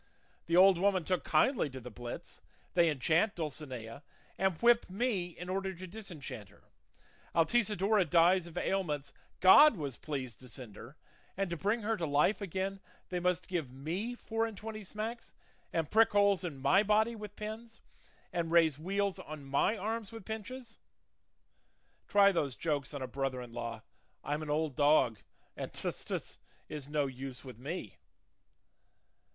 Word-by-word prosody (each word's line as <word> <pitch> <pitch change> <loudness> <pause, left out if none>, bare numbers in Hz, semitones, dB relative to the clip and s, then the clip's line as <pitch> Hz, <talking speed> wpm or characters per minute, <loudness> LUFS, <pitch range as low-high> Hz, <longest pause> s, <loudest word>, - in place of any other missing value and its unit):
'The 170 - +1
old 185 -1 +7
woman 190 -2 +2
took 185 +1 0
kindly 160 - +2
to 130 -1 -8
the 125 0 -9
blits;' 120 +2 -8 0.3
they 170 -2 +5
enchant 160 - +2
Dulcinea, 135 -7 -5 0.3
and 190 -3 0
whip 235 -2 +4
me 200 -2 0
in 180 - -7
order 190 0 -2
to 185 +2 -8
disenchant 170 - -8
her; - - -22 0.7
Altisidora 205 +2 +3
dies 175 +2 +4
of 170 0 -10
ailments 165 -7 -1 0.3
God 235 +7 +8
was 140 -6 -4
pleased 130 -6 -5
to 130 - -13
send 115 -2 -8
her, 130 +7 -11 0.4
and 195 -2 -1
to - - 0
bring 205 +6 0
her 225 +2 +1
to 170 -4 -2
life 150 +9 +2
again 195 +1 -3 0.3
they 180 - -1
must 180 0 0
give 170 -8 -2
me 170 - -4
four 225 -1 -1
and 220 -3 -8
twenty 215 0 -6
smacks, 220 +4 -5 0.4
and 165 -3 -1
prick 225 0 +5
holes 200 -2 +4
in 165 -6 -4
my 140 +9 +4
body 215 +2 +2
with 210 -2 -8
pins, 225 +2 -7 0.5
and 170 -2 -1
raise 160 -4 +4
weals 195 +3 -1
on 155 -2 -8
my 140 +11 +1
arms 220 +2 -3
with 225 -4 -9
pinches! 225 +2 -7 1.3
Try 200 -1 +6
those 145 -8 -1
jokes 145 -3 -2
on 140 - -4
a - - -3
brother 135 0 -2
in 120 -2 -9
law; 115 -2 -5 0.4
'I'm 150 +2 -2
an 155 - -6
old 150 -2 0
dog, 145 -7 +4 0.4
and - - -5
"tus, - - -3
tus" - - -5 0.3
is 145 -2 -6
no 150 -1 +1
use 130 0 -7
with 125 -3 -10
me. 140 - -6
175 Hz, 165 wpm, -32 LUFS, 145-205 Hz, 1.3 s, God